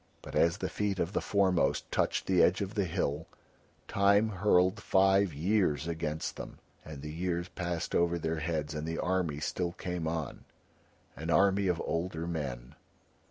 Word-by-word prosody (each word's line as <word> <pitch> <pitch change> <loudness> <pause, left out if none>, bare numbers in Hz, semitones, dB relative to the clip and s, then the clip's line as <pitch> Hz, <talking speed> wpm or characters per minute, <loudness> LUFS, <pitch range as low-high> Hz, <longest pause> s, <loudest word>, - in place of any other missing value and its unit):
But - - -9
as 85 +2 +3
the - - -2
feet 105 -2 -2
of 90 +2 -1
the - - 0
foremost 95 -7 +1
touched - - 0
the 95 -2 +3
edge 90 - +4
of 100 +1 -3
the 100 -4 0
hill 80 -2 -2 0.6
Time 100 +2 +3
hurled 95 +1 +2
five 95 0 +3
years 80 -1 +1
against 80 -2 -3
them, - - -8 0.3
and 75 -2 -9
the 75 0 -6
years 85 +1 -2
passed 85 -2 -3
over 85 0 +2
their 80 0 -2
heads 80 -1 -2
and 75 +1 -4
the 80 0 -3
army 90 -5 0
still 85 +3 -2
came 90 -3 -4
on, 80 -4 -4 0.7
an 80 +3 -6
army 100 +2 +3
of 90 -2 +1
older 85 -1 -2
men. 70 -8 -4
85 Hz, 165 wpm, -31 LUFS, 80-95 Hz, 0.7 s, edge